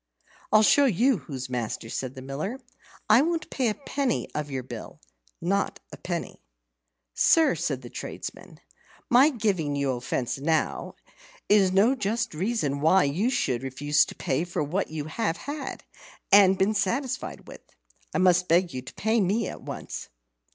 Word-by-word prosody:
"I'll 215 0 +6
show 285 +6 +5
you 245 +2 +3
who's 130 -4 -6
master!" 120 -2 -4
said 130 +2 -4
the 130 - -8
Miller. 155 - -4 0.5
"I 215 +4 +6
won't 325 +1 -1
pay 255 -3 0
a 210 - -2
penny 275 -3 -2
of 150 -1 -3
your 130 -2 -4
bill - - -9 0.4
not 195 +3 -1
a - - -9
penny." 175 -2 -5 0.7
"Sir," 320 -3 +4
said 145 -5 -3
the 120 - -9
tradesman, - - -8 0.5
"my 260 +5 +7
giving 195 - -1
you 140 -1 0
offence 125 +1 -3
now, 160 +2 -1 0.5
is 200 -3 +5
no 200 +7 +4
just 230 -4 -2
reason 155 - -1
why 180 +5 +5
you 175 - +1
should 130 - 0
refuse 140 +3 +2
to - - -10
pay 135 +5 -1
for 175 -3 -2
what 175 +7 -2
you 155 -2 -5
have 165 +2 -2
had 285 -2 -6 0.5
and 195 -1 +7
been 195 +3 +2
satisfied 235 +7 -2
with. - - -11 0.5
I - - -2
must 180 -1 +4
beg 175 -1 +3
you 130 - -4
to 130 - -11
pay 220 +2 +1
me 200 +5 +1
at - - -7
once." - - -7
185 Hz, 165 wpm, -26 LUFS, 145-225 Hz, 0.7 s, my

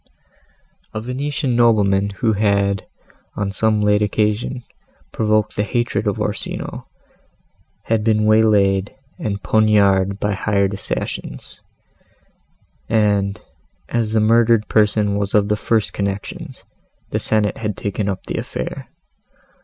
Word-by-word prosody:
A - - -1
Venetian 125 +2 -2
nobleman, 100 -4 +3
who 110 +3 0
had, 100 -1 +1 0.5
on 100 -1 -2
some 110 +1 +1
late 105 0 +3
occasion, 105 +4 0 0.5
provoked 110 -1 +1
the - - 0
hatred 120 +3 -1
of - - -1
Orsino, - - -4 1.0
had 110 -1 0
been 110 -1 +2
way 110 +1 +5
laid 100 -1 +2 0.2
and 100 -2 -3
poniarded 100 -3 +3
by 105 0 0
hired 100 -1 0
assassins: 65 -9 -5 1.3
and, 105 -3 +1 0.5
as 115 -2 -1
the 110 - +3
murdered 115 0 +3
person 105 -1 +2
was 100 0 -2
of 105 -1 +3
the 105 - +2
first 110 0 0
connections, 100 0 -5 0.5
the - - 0
Senate 105 -2 0
had 105 -3 -3
taken 100 0 -2
up 95 - -4
the - - -4
affair. - - -5
105 Hz, 120 wpm, -20 LUFS, 100-110 Hz, 1.3 s, way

